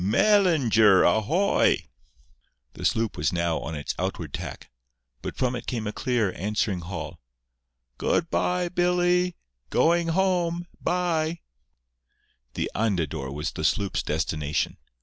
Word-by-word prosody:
"Mel 205 - +4
lin 160 - +1
ger 105 -4 +6
a 110 - +4
hoy!" 180 - +2 0.9
The - - -6
sloop 115 -1 +1
was - - +1
now 85 -2 0
on 80 - -5
its 75 - -3
outward - - -3
tack; - - -7 0.5
but - - -6
from 125 -1 0
it 120 - -7
came 115 -3 -2
a 105 - -2
clear, 120 -7 0
answering 100 -1 -1
hail: 90 +3 -6 0.8
"Good 165 - 0
bye, 180 0 +1
Billy… 180 0 +2 0.3
go 165 - +4
ing 170 -1 0
home—bye!" 175 -2 0 1.1
The - - -2
Andador 80 -10 -1
was 75 +2 -3
the 80 - -6
sloop's 100 +4 +1
destination. 75 -1 -1
120 Hz, 130 wpm, -26 LUFS, -, 1.1 s, ger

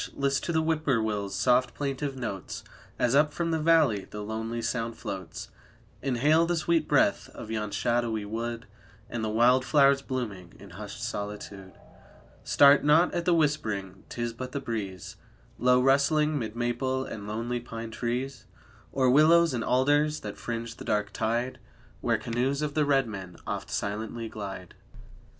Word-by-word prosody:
list 140 0 0
to - - -2
the 160 -1 +1
Whip 160 -1 0
poor 130 -5 +3
will's 105 -2 -2
soft 125 -1 +2
plaintive 140 0 -3
notes, 105 -7 -5 0.3
As 125 - +2
up 150 +2 +4
from 165 +1 -2
the 160 - +1
valley 155 -11 +3
the 105 0 -6
lonely 110 +2 -4
sound 115 0 -2
floats, 95 -6 -6 0.5
Inhale 145 +6 +3
the 175 - +1
sweet 170 0 +1
breath - - +2
of 110 - -8
yon 105 -2 -2
shadowy 115 -1 0
wood 115 +2 -4 0.5
And 120 -2 -3
the 110 - -1
wild 120 +4 +4
flowers 140 0 +4
blooming 110 -10 -5
in - - -13
hushed - - -8
solitude. 100 -2 -6 0.7
Start 140 0 +6
not 155 +4 +4
at 175 -1 -2
the 180 - +4
whispering, 110 - -1
'tis 120 -1 -3
but 125 +2 -7
the 140 - -1
breeze, 100 -8 -5 0.4
Low 125 0 +4
rustling, 145 +3 +3
'mid 110 -2 -5
maple 130 +2 -1
and 105 -4 -7
lonely 115 +3 -2
pine 115 -1 -7
trees, 120 +2 -3 0.4
Or 130 -1 +2
willows 160 +3 +5
and 120 -2 -1
alders 145 +4 +2
that 105 -1 -6
fringe 115 0 -5
the - - -8
dark 105 -1 -1
tide 120 +4 -1 0.4
Where 115 -1 +1
canoes 125 +6 -1
of 145 -1 -2
the 150 -1 +2
red 135 -2 +3
men 95 -5 -7
oft - - -4
silently 110 +3 -3
glide. 95 -4 -7
120 Hz, 165 wpm, -28 LUFS, 110-140 Hz, 0.7 s, Start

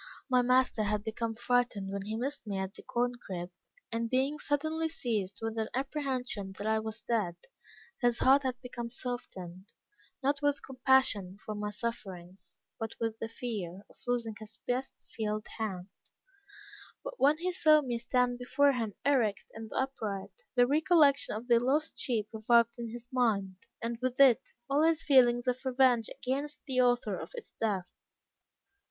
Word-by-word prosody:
My 250 0 +5
master 250 -2 +3
had 210 0 0
become 225 0 -3
frightened 240 -4 0
when 200 - -2
he 210 +3 -4
missed 260 +1 -4
me 200 -1 -2
at 190 0 -3
the - - -12
corn 245 +1 0
crib, 175 -1 -5 0.4
and 230 0 -1
being 270 +4 +1
suddenly 315 +3 0
seized 210 - -2
with 225 0 -2
an 220 - 0
apprehension 260 -7 -2
that 205 - -5
I 220 0 +2
was 220 +1 -6
dead, 210 -8 0 0.7
his 240 -1 +3
heart 270 +2 +5
had 255 -2 -2
become 240 -1 -5
softened, 195 -7 -6 0.5
not 280 +1 +1
with 290 -1 +1
compassion 255 -8 +2
for 215 - -3
my 210 0 -3
sufferings, 190 -6 -7 0.2
but 225 -1 -4
with 225 -1 -2
the 225 - -4
fear 205 -6 -5
of - - -21
losing 235 -2 0
his 215 0 -11
best 255 +2 -3
field 215 -1 -2
hand; 195 -4 -3 1.1
but - - -7
when 290 +3 +5
he 360 +3 -1
saw 310 -4 +6
me 240 -3 -2
stand 245 +1 +1
before 280 +3 +3
him 225 -6 -2
erect, 245 -8 +2
and 225 -1 -8
upright, 220 -7 -3 0.2
the 245 -1 +6
recollection 295 -2 +4
of 225 +3 -6
the 235 -2 +5
lost 285 +6 0
sheep 225 -5 0
revived 235 +1 +4
in 235 -1 -4
his 240 +1 -8
mind, 205 -7 +1 0.3
and 230 0 -2
with 255 0 -1
it, 265 -4 +7 0.3
all 280 +2 +2
his 325 0 +3
feelings 245 -3 +5
of 250 +1 0
revenge 255 -3 +3
against 285 +3 -3
the 260 -3 +2
author 245 -4 +2
of - - -7
its 470 - -9
death. 200 -5 -1
240 Hz, 165 wpm, -31 LUFS, 215-265 Hz, 1.1 s, it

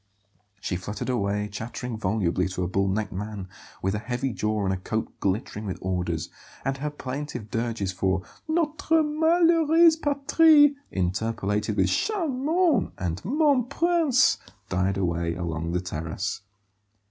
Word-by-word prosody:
She 90 -2 -2
fluttered 105 +7 -5
away, 105 -3 0
chattering 115 +3 -5
volubly 95 -4 0
to 90 0 -3
a - - -1
bull 95 +1 +1
necked 100 +1 -1
man 100 0 -5 0.4
with 95 +1 +1
a 105 - -1
heavy 120 +3 -2
jaw 105 0 -1
and 95 - +1
a - - -2
coat 110 +4 -3
glittering 105 +1 -2
with 95 - -3
orders; 90 -3 -2 0.4
and 135 0 0
her 150 +2 -2
plaintive 130 -5 -6
dirges 115 -5 -1
for 95 0 0 0.2
"notre 315 0 +2
malheureuse 325 +1 +4
patrie," 290 0 +5 0.2
interpolated 100 +2 -1
with - - +3
"charmant" 320 - +1
and 90 -2 -3
"mon 280 - +3
prince," 325 -3 +3 0.3
died 95 +1 0
away 85 -3 -1
along 85 -1 -3
the 90 - 0
terrace. 90 +4 -4
110 Hz, 135 wpm, -26 LUFS, -, 0.4 s, patrie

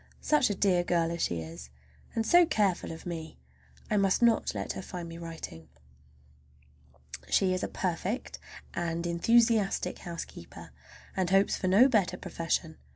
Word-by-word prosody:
Such 300 -6 +3
a 205 - -1
dear 185 -2 +2
girl 170 -1 +1
as 170 - -4
she 85 -1 -1
is, 80 -5 -9 0.5
and 225 -1 0
so 350 +8 +6
careful 205 - 0
of 160 - -9
me! 165 -2 -6 0.5
I 210 - +1
must 195 +3 +2
not 230 - +3
let 100 -1 -3
her 95 - -6
find 175 - -7
me 165 0 -9
writing. 160 - -8 1.6
She 185 -1 +3
is 185 - -2
a - - -1
perfect, 185 +6 -3 0.3
and 170 0 -2
enthusiastic 220 +4 +2
housekeeper, 170 - -8 0.4
and 185 -2 0
hopes 195 +1 +3
for 185 - -2
no 205 +8 +6
better 215 -8 +1
profession. 165 -3 -3
180 Hz, 155 wpm, -29 LUFS, 165-205 Hz, 1.6 s, so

